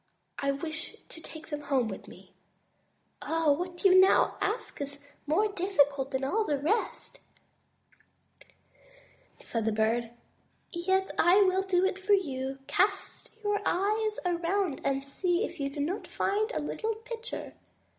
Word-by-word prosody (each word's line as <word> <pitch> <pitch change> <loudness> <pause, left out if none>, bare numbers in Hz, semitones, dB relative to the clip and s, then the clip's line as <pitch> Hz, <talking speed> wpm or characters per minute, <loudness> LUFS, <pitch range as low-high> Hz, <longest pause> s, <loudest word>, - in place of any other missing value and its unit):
I 275 - 0
wish 315 +3 -5
to 325 - -11
take 315 0 -11
them 295 -1 -4
home 275 -5 +1
with 195 -3 -7
me." - - -15 0.9
"What 330 +2 0
you 370 -1 +8
now 380 +1 +5
ask 420 -6 -2
of 280 - -1
me 285 - -10
is 285 - -21 0.2
more 410 +8 +2
difficult 290 -8 +2
than 265 0 -2
all 410 +12 +1
the 295 -8 0
rest," 430 - -2 2.2
said 230 -2 -2
the 220 - +2
Bird, 225 +2 +1 0.6
"yet 380 +2 0
I 365 +4 +6
will 375 0 +3
do 380 -1 +2
it 385 0 -1
for 405 +2 +2
you. 270 -8 0
Cast 395 +8 0
your 415 0 +1
eyes 425 +3 +1
around 350 -1 0
and 275 0 -1
see 355 +6 0
if 345 - -9
you 275 -1 -1
do 280 - -8
not 335 +8 -2
find 430 +4 0
a - - -2
little 445 0 -2
pitcher." 470 +1 -7
350 Hz, 150 wpm, -29 LUFS, 280-395 Hz, 2.2 s, you